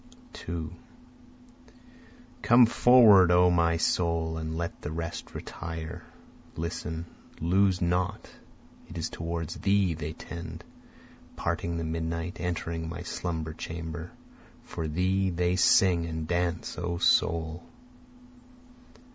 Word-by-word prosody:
2 80 -2 -5 1.7
Come 120 +1 +7
forward 115 -6 +7
O 90 0 +5
my 85 -1 +3
soul, 80 -1 0
and 80 0 -4
let 85 0 -4
the 75 - -5
rest 85 0 -5
retire, 80 -1 -6 0.5
Listen, 80 0 -4 0.3
lose 90 +2 +2
not, 90 +1 -1 0.6
it 85 - -8
is 80 - -3
toward 85 -1 -4
thee 95 0 +1
they 80 0 -5
tend, 85 +2 -8 0.7
Parting 85 0 -2
the 85 - -2
midnight, 80 +2 -3
entering 85 -1 -3
my 85 +1 -6
slumber 80 -3 -4
chamber, 80 +1 -6 0.5
For 80 - -5
thee 95 +4 +1
they 90 0 0
sing 90 -2 +4
and 80 -1 -4
dance 85 0 -1
O 85 0 -2
soul. 80 -1 +2
85 Hz, 110 wpm, -28 LUFS, 80-90 Hz, 1.7 s, Come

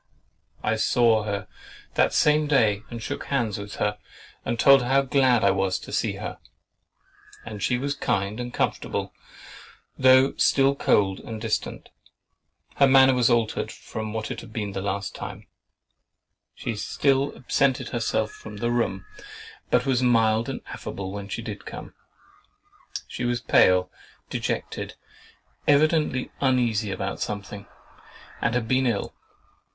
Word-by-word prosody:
I 110 +1 +1
saw 110 -1 +3
her 100 -1 -3 0.5
that - - +3
same 150 0 +3
day 110 -8 +3
and 115 -2 -7
shook - - -4
hands 120 -7 -1
with 100 0 -7
her, 105 0 -1 0.4
and 115 - -2
told 135 +1 +7
her 120 - -3
how 135 +1 +3
glad 130 -3 +3
I 100 - +5
was 95 -1 0
to - - -10
see - - 0
her; - - -6 1.1
and 105 -2 -7
she 125 - +1
was 140 +3 -2
kind 105 -5 -1
and 120 0 -4
comfortable, - - -2 0.9
though 130 +1 +6
still 135 0 +4
cold 95 -7 +2
and 110 -1 -7
distant. 110 0 -3 0.9
Her 140 - +6
manner 135 0 +6
was 125 -1 +3
altered 115 -2 0
from 110 -1 -6
what 110 0 -4
it - - -5
was - - -12
the 100 -3 -4
last 100 0 -3
time. - - -8 1.1
She 115 - -4
still 135 +5 +1
absented 135 0 0
herself 110 -2 -1
from 105 -1 -10
the 120 +3 -1
room, 115 -5 -1 0.6
but 125 +1 +2
was 130 -2 +1
mild 115 -2 +3
and - - -5
affable 95 -1 -6
when 100 0 -7
she - - -4
did - - -7
come. - - -8 1.1
She - - -6
was 120 0 0
pale, 90 -4 +4 0.4
dejected, - - -3 0.7
evidently 150 -2 +2
uneasy 120 -6 +1
about 95 +1 -3
something, 100 -1 -5 0.7
and 120 0 +1
had 120 -2 -1
been 130 +2 +2
ill. 110 -4 -1
115 Hz, 145 wpm, -25 LUFS, 105-130 Hz, 1.1 s, told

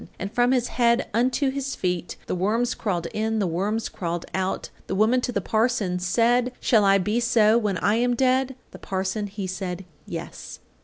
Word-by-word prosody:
And 200 +4 -5
from 245 +1 +3
his 250 -2 +1
head 235 -1 +2
unto 255 +4 +2
his 275 0 -3
feet 180 -1 -2
The - - -3
worms 220 +7 +1
crawled 180 -6 -2
in, 220 +1 -1
the 205 - +1
worms 200 +6 -1
crawled 170 -1 -4
out. 190 0 -2 0.2
The 190 - -2
woman 225 +5 +3
to 245 - -2
the 200 - -1
parson 215 -4 0
said: 240 +7 +2
"Shall 220 -4 +3
I 195 0 +5
be 210 +5 0
so 225 -2 +4
when 205 -4 -1
I 205 +5 +2
am 245 +1 +2
dead?" 260 +1 +2 0.2
The - - -11
parson 190 +2 -2
he 200 0 -5
said 185 0 -4 0.2
"yes." - - -7
215 Hz, 190 wpm, -24 LUFS, 190-245 Hz, 0.2 s, I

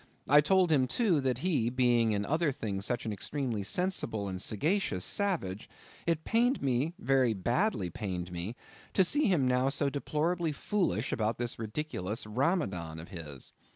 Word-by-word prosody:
I 145 +2 +7
told 185 +2 +3
him, 135 -4 +4
too, 185 - +2
that 130 -3 0
he 145 -11 +2
being 120 -2 +3
in 100 -1 0
other 155 +3 +1
things 100 -5 -3
such 120 -1 -1
an 110 - -2
extremely 120 +1 -3
sensible 110 - -1
and 95 -1 -4
sagacious 145 - 0
savage, 165 - -1 0.4
it 165 -2 +1
pained 245 +4 +2
me, 140 +5 0
very 130 -3 +2
badly 120 - 0
pained 90 -3 -4
me, 90 +6 -4 0.4
to 190 - +6
see 290 - +3
him 160 -10 +3
now 125 +1 +2
so 140 0 0
deplorably 160 +3 -1
foolish 145 - -1
about 110 0 0
this 120 -1 -3
ridiculous 110 -4 -3
Ramadan 105 - -1
of 80 +2 -9
his. 75 -8 -8
125 Hz, 160 wpm, -31 LUFS, 105-165 Hz, 0.4 s, I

